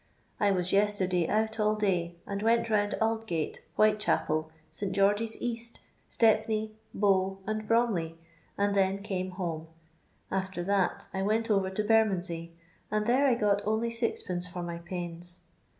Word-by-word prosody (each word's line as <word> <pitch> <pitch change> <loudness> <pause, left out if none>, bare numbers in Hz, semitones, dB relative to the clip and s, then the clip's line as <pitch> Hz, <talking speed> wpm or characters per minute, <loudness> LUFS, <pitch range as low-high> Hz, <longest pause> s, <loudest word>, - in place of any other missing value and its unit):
I 205 - +3
was 185 -2 +2
yesterday 190 -4 +2
ont 220 +1 0
all 215 0 +3
day, 180 -5 0
and 200 0 -4
went 230 +1 +3
roMid 205 -1 +2
Aldgate, 220 -8 -1 0.2
Whitechapel, 210 -7 +2 0.2
St 190 +4 -3
George's 205 +3 +2
East, 235 -1 -3 0.3
Stepney^ 220 -1 +2 0.2
Bow, 195 -1 +2
and 215 0 -3
Broudey, 210 -9 +1 0.4
and 200 0 +2
then 195 0 +1
came 185 -3 -2
home; 170 -4 -4 0.6
after 190 -2 -2
that, 195 0 0
I 190 - -1
went 220 +3 +1
over 195 -2 +2
to 190 +3 -2
Bermondsey, 180 -6 +1 0.3
and 210 0 0
there 260 +5 +4
I 250 - +4
got 205 -3 +2
only 220 +3 0
Od. 225 -6 -1
for 180 0 -5
my 170 -1 -5
pains. 175 0 -7
200 Hz, 145 wpm, -29 LUFS, 180-220 Hz, 0.6 s, there